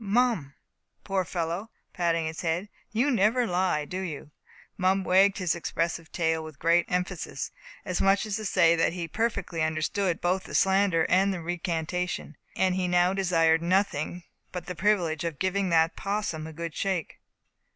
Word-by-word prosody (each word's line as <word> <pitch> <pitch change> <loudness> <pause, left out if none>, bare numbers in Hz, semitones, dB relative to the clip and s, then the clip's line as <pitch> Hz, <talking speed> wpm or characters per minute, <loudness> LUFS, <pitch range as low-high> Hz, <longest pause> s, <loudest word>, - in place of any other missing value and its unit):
Mum, 210 - +1 0.5
poor 195 -2 0
fellow," 175 +4 -3 0.2
patting 170 -2 0
his 160 0 -4
head, 175 +4 -1 0.2
"you 245 +6 +2
never 230 +2 +3
lie, 180 -6 0
do 185 +4 -5
you?" 155 -5 -6 0.4
Mum 190 +1 +2
wagged 195 +2 +4
his 180 -4 +1
expressive 165 -1 -3
tail 160 -1 0
with 155 -2 -10
great 170 +2 +3
emphasis, 180 -1 -2 0.3
as 180 -2 -1
much 195 +1 +3
as 210 -2 -2
to 215 - -5
say 170 -3 +4
that 165 0 +1
he 175 -2 -4
perfectly 200 -4 -2
understood 160 +4 0
both 180 +2 0
the - - -6
slander 190 -4 +3
and 195 +2 +3
the 185 - -3
recantation, 175 -1 -3 0.2
and 190 -1 +2
that - - -2
he 185 -1 0
now 180 +1 +3
desired 165 -4 +3
nothing 180 -2 0 0.3
but 180 -2 -5
the 180 - -4
privilege 175 -3 +1
of 165 -4 -3
giving 190 +2 0
that 165 0 +3
'possum 195 -6 -3
a 160 - -9
good 165 0 -5
shake. 190 -5 -2
180 Hz, 170 wpm, -27 LUFS, 165-195 Hz, 0.5 s, wagged